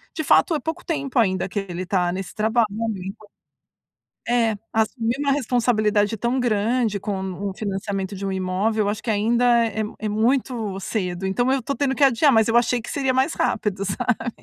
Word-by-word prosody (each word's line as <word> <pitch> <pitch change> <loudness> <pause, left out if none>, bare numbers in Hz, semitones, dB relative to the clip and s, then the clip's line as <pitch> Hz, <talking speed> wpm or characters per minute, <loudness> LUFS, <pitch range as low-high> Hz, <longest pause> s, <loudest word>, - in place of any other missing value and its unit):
de 315 - -2
fato 320 +3 +4
é - - 0
pouco 320 +5 -5
tempo 280 -6 -1
ainda 190 -5 +1
que 200 +2 -3
ele 180 +1 -4
tá 180 -1 +1
nesse 190 +1 -5
trabalho, 220 +2 +2 0.4
então 205 +3 -9 1.0
É, 230 -3 +2 0.2
assumir 225 +2 0
uma 280 -1 +2
responsabilidade 225 -5 +1
tão 240 +5 0
grande 225 -2 +1
como 190 -1 -3
o 190 - -6
financiamento 195 -1 -3
de 195 0 -5
um - - -1
imóvel, 190 +4 0
eu - - 0
acho 210 +1 -4
que 230 - -2
ainda 235 +3 +3
é 220 0 -2 0.2
é 215 - -4
muito 225 -2 0
cedo, 185 -3 -3
então, 240 +7 +1
eu 270 0 +2
tô 280 - -2
tendo 275 -1 0
que 285 - +4
adiar, 270 +2 +4
mas 225 -4 +4
eu 230 - +2
achei 240 +1 +3
que - - -8
seria 270 -2 0
mais 265 +5 +2
rápido, 205 -2 -1
sabe? 230 +5 -1
220 Hz, 190 wpm, -23 LUFS, 200-245 Hz, 1.0 s, fato